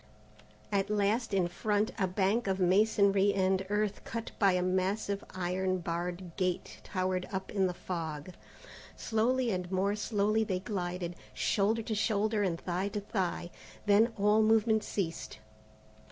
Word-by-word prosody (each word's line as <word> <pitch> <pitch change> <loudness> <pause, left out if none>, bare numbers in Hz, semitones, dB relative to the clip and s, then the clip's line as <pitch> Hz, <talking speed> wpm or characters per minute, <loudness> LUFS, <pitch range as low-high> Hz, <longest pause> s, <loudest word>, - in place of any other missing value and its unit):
At 200 0 +1
last 210 +3 +1
in 190 -3 +2
front, 205 +4 0
a 190 - +2
bank 195 +5 +1
of 190 0 0
masonry 200 +1 +4
and 190 0 +2
earth 210 0 -1
cut 230 0 -5
by 195 -3 +5
a 180 0 +1
massive 195 +2 0
iron 185 +1 0
barred 175 0 -4
gate 185 -1 -2
towered 185 -1 -1
up 190 -1 -4
in 195 -2 +2
the 180 - -3
fog. 160 -2 -5 0.6
Slowly 240 +2 +1
and 180 -1 -3
more 195 +2 +1
slowly 215 +1 +1
they 190 -4 -1
glided, 180 -3 -3 0.2
shoulder 220 +3 +1
to 220 - -3
shoulder 215 0 +1
and 175 -4 0
thigh 185 +2 -2
to 205 +1 -3
thigh. 185 -4 -2 0.3
Then 210 +3 +5
all 210 +2 +4
movement 220 0 +3
ceased. 165 - -3
195 Hz, 145 wpm, -31 LUFS, 185-210 Hz, 0.6 s, by